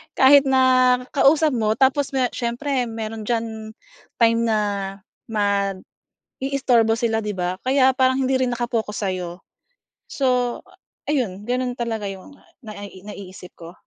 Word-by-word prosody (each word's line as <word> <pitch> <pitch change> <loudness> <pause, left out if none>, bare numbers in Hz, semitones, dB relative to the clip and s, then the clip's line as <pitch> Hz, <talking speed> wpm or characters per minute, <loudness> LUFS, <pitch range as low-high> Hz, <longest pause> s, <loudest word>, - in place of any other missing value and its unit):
Kahit 275 +1 +6
na 255 -1 +4 0.2
kausap 300 +2 +4
mo 220 -3 +1
tapos 270 +2 +2
me 255 -2 +2
siyempre 250 +2 -2
mayro'n 225 -1 -6
diyan 230 -1 0 0.8
time 230 0 +4
na 220 -1 +2 0.7
mag-i-istorbo 200 -3 -2 0.9
sila 230 -1 0
'di 210 -2 -4
ba. 180 0 -3
Kaya 265 0 +4
parang 260 0 +2
hindi 265 +1 0
rin 255 -1 +1
naka-focus 225 -4 -2
sa'yo. 180 -1 -4 0.6
So, 250 -3 0 0.5
ayun 210 -9 -1
gano'n 250 0 -1
talaga 230 -4 -3
'yong 195 +8 -8 0.3
nai 205 -2 -9
naiisip 190 -3 -11
ko. 170 +1 -11
230 Hz, 125 wpm, -22 LUFS, 205-260 Hz, 0.9 s, Kahit